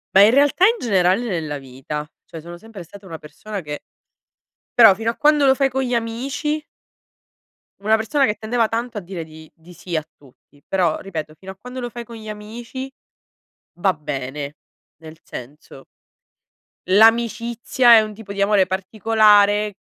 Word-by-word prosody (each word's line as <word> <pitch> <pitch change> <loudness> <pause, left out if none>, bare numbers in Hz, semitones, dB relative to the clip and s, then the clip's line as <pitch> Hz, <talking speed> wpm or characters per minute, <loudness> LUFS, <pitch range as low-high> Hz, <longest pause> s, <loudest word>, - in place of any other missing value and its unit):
Ma 195 - +9
in 215 - +6
realtà, 290 +7 +4
in 460 - +4
generale 190 0 +2
nella 160 -8 -3
vita, 135 +3 -7 0.2
cioè 165 - -10
sono 175 +2 -10
sempre 220 -1 -11
stata 200 +4 -15
una 165 -3 -8
persona, 195 +7 -8
che 150 -2 -6 1.0
Però, 220 -4 +9
fino 225 +2 -2
a - - -13
quando 300 -1 +3
lo 265 - +5
fai 275 0 +2
con 265 +1 -2
gli 250 -1 -2
amici 270 +7 -2 1.2
Una 220 +1 +4
persona 270 +6 +1
che 210 - -1
tendeva 220 +1 0
tanto 230 -1 -3
a - - -10
dire 175 -2 -7
di 155 0 -14
di 170 +2 -16
sì 175 +1 -6
a 155 - -1
tutti, 140 +1 -24
però, 180 -5 +1
ripeto, 155 -5 -6
fino 190 +5 -11
a - - -13
quando 250 +2 -8
lo 245 - -4
fai 240 0 -8
con 235 0 -12
gli 215 -1 -9
amici, 230 +5 -7 0.9
va 190 0 +2
bene, 145 0 -6 0.4
nel 160 0 -13
senso 135 +1 -11 1.1
l'amicizia 235 +3 +4
è 220 - +8
un 215 -1 -5
tipo 205 -1 -9
di 200 - -3
amore 200 -1 +3
particolare 205 +1 +3
210 Hz, 170 wpm, -21 LUFS, 165-235 Hz, 1.2 s, Ma